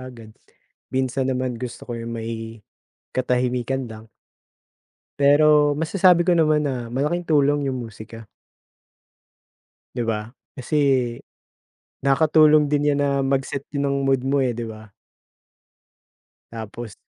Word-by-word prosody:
agad. 115 -4 -11 0.6
Minsan 130 0 -1
naman, 130 -2 -2
gusto 125 -2 -7
ko - - -4
yung 115 0 -6
may 115 -1 -6 0.5
katahimikan 125 +1 -1
lang. 110 0 -10 1.2
Pero 145 0 +5
masasabi 175 +2 +3
ko 180 - +3
naman 155 -3 +3
na 125 -4 -3
malaking 150 +8 -1
tulong 145 -2 +2
yung 130 - -2
musika. 115 +1 -11 1.7
Di - - -2
ba 105 -1 -1 0.3
kasi 130 +4 -3 1.2
nakakatulong 155 +2 +4
din 145 0 +1
yan 145 - 0
na - - +1
mag-set 135 +1 -2
din 140 -1 -3
ng 140 0 0
mood 135 -1 +1
mo, 140 +1 +1
eh, 125 -3 0
di 120 - -4
ba? 110 -2 -10 1.6
Tapos. 115 0 -7
135 Hz, 120 wpm, -22 LUFS, 115-145 Hz, 1.7 s, Pero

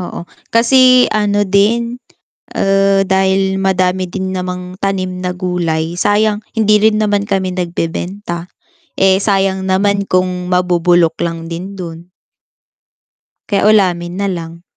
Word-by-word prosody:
Oo, 175 -1 -6 0.3
kasi 255 +1 +5
ano 205 -1 +1
din, 230 +5 +1 0.6
ah, 195 0 +2
dahil 190 0 +1
madami 185 -1 0
din 190 -1 -3
namang 180 0 -5
tanim 185 -2 -2
na 180 - -1
gulay, 175 -2 -2
sayang 210 +2 +1
hindi 215 -2 +3
rin 215 -1 +3
naman 205 -1 +1
kami 190 -3 -2
nagbebenta. 175 +1 -4 0.5
Eh, 190 0 +3
sayang 195 -2 +1
naman 200 +1 +1
kung 185 -1 0
mabubulok 175 -2 +2
lang 165 -1 -3
din 185 +4 -6
dun. 170 -1 -8 1.4
Kaya 200 -2 0
ulamin 180 -3 +1
na 200 - -1
lang. 170 -2 -6
190 Hz, 120 wpm, -15 LUFS, 180-200 Hz, 1.4 s, kasi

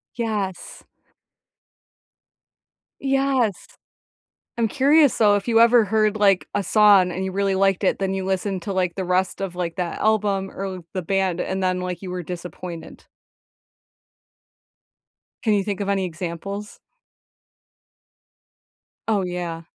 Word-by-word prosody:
Yes. 210 -6 -4 2.2
Yes. 270 -7 0 0.9
I'm 230 -1 +2
curious 285 +3 +4
though, 210 -2 +5
if 205 +4 -4
you 230 0 +4
ever 235 -1 +6
heard, 215 +1 +1
like, 200 -3 +3
a 200 - +1
song 200 -2 +5
and 185 +2 -3
you 190 - -3
really 195 0 0
liked 195 0 +2
it, - - +2
then 195 -1 -1
you 190 -1 -3
listened 190 -1 -2
to, 200 - -4
like, 180 -2 0
the 190 - -2
rest 180 +2 0
of, 185 -2 -4
like, 175 0 -3
that 180 -2 -3
album 205 -3 +1
or 195 - -6
l 185 -3 -7
the 185 - -3
band, 190 0 0
and 190 0 -2
then, 185 0 0
like, 180 +1 -5
you 185 - -6
were 180 0 -4
disappointed. 175 0 -8 2.4
Can 220 - +2
you 200 - +2
think 200 -1 -4
of 200 - -2
any 195 -1 +1
examples? 180 +4 -6 2.3
Oh 210 -3 +2
yeah. 175 -2 -4
195 Hz, 140 wpm, -22 LUFS, 180-210 Hz, 2.4 s, ever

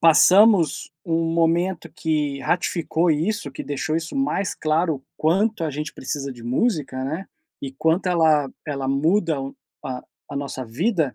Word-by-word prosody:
passamos 180 0 +5
um 165 0 0
momento 170 0 +1
que 150 -4 -1
ratificou 170 -1 0
isso, 160 +1 0
que 135 - -7
deixou 155 +2 -2
isso 165 0 -4
mais 270 -8 0
claro, 155 0 +1
o 135 - -15
quanto 190 +4 +1
a 155 - -1
gente 150 +2 -4
precisa 135 0 -4
de 120 -2 -13
música, 130 - 0
né, 160 +8 -4 0.3
e 135 - -5
quanto 160 +7 +1
ela 155 -5 +3 0.2
ela 140 -2 -3
muda 160 +4 +2 0.5
a 125 -1 -4 0.2
a - - -9
nossa 140 -2 -4
vida, 155 - 0
160 Hz, 150 wpm, -23 LUFS, 140-175 Hz, 0.5 s, passamos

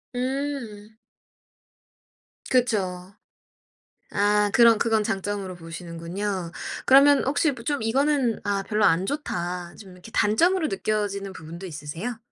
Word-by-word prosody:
음. 255 -5 -3 1.6
그쵸. 195 -7 0 1.0
아 205 0 +2
그럼 230 -2 +6
그건 220 -2 +2
장점으로 195 -2 -3
보시는군요. 170 +2 -5 0.3
그러면 280 +2 +6
혹시 290 +3 +2
뭐 240 -3 -9
좀 285 0 -1
이거는 265 0 +1
'아 200 -1 -1
별로 210 +1 +1
안 175 +4 +3
좋다.' 180 - -4
좀 195 -3 -12
이렇게 180 +5 -14
단점으로 325 - +2
느껴지는 200 -1 -2
부분도 170 +3 -9
있으세요? 170 +9 -6
210 Hz, 255 characters per minute, -25 LUFS, 180-245 Hz, 1.6 s, 그럼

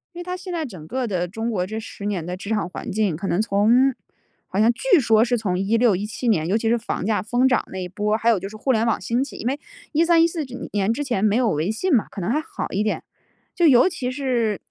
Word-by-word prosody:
因 350 - -7
为 - - -5
他 360 +1 -4
现 370 0 -8
在 325 -2 -2
整 180 - -10
个 255 +1 -2
的 180 -3 -1
中 225 +5 -4
国 185 -4 -1
这 220 +3 -5
10 220 -2 -7
年 195 -6 -2
的 180 +1 -4
职 200 - -8
场 210 -5 0
环 - - -7
境， 200 -6 0
可 195 +3 -4
能 185 - +1
从 230 +6 +3 0.5
好 190 - -5
像 230 +2 +5
据 390 - +3
说 225 -2 +4
是 245 0 +1
从 185 -4 -1
16-17 215 +2 +1
年， 165 -7 +2
尤 205 +4 +2
其 225 0 0
是 235 - +3
房 230 -4 -4
价 210 -3 +1
疯 245 +5 +1
涨 250 - +1
那 190 - -6
一 180 -1 -4
波， 210 +3 0
还 225 +1 +1
有 225 -4 +3
就 195 - -5
是 215 - -11
互 260 +5 0
联 230 0 +2
网 225 - +1
兴 240 +2 0
起， 280 - -11
因 - - -7
为 275 +4 -1 0.3
13-14 330 0 +3
之 255 0 -8
年 205 +2 +1
之 290 - -3
前 240 -8 -1
没 210 0 +3
有 245 -3 +2
微 155 +4 -1
信 310 +10 0
嘛， 225 - +3
可 195 - -7
能 190 +7 -1
还 300 - +2
好 315 - -5
一 200 - 0
点， 215 - -1 0.5
就 345 -2 +3
尤 260 +4 +6
其 255 -8 -4
是 245 -6 -1
225 Hz, 275 characters per minute, -22 LUFS, 200-255 Hz, 0.5 s, 尤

